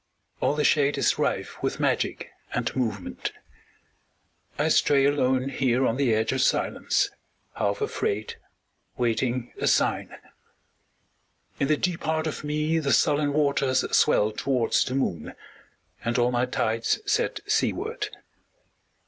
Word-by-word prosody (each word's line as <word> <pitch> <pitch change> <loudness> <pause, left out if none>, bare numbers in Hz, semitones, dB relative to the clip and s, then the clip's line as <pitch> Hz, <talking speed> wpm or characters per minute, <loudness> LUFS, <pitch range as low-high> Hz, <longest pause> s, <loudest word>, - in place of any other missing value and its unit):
All 145 - +1
the 150 - 0
shade 145 -1 +3
Is - - +1
rife - - -2
with - - -2
magic - - -1 0.2
and - - -2
movement. 110 -7 -3 1.3
I - - +1
stray 140 -1 +4
alone 130 -2 +1
Here 130 -1 +1
on 115 - 0
the 130 -5 +2
edge 110 +1 0
of 130 -1 0
silence, - - +1 0.4
half 100 0 -1
afraid, 105 +1 -2 0.6
Waiting 120 +1 -1
a - - +1
sign. - - +1 1.4
In 140 - +1
the 155 0 +2
deep 180 0 -1
heart 160 0 -1
of 155 - -4
me 150 +2 0
The 140 -4 +1
sullen 145 +3 +3
waters 140 -3 +1
swell 105 +1 +3
towards 125 +2 +1
the 130 - -3
moon, 90 - -2 0.7
And 115 +1 -1
all 120 0 +2
my 125 +1 +1
tides 115 -2 0
set 430 +4 0
seaward. 450 +2 -1
130 Hz, 130 wpm, -26 LUFS, 120-150 Hz, 1.4 s, stray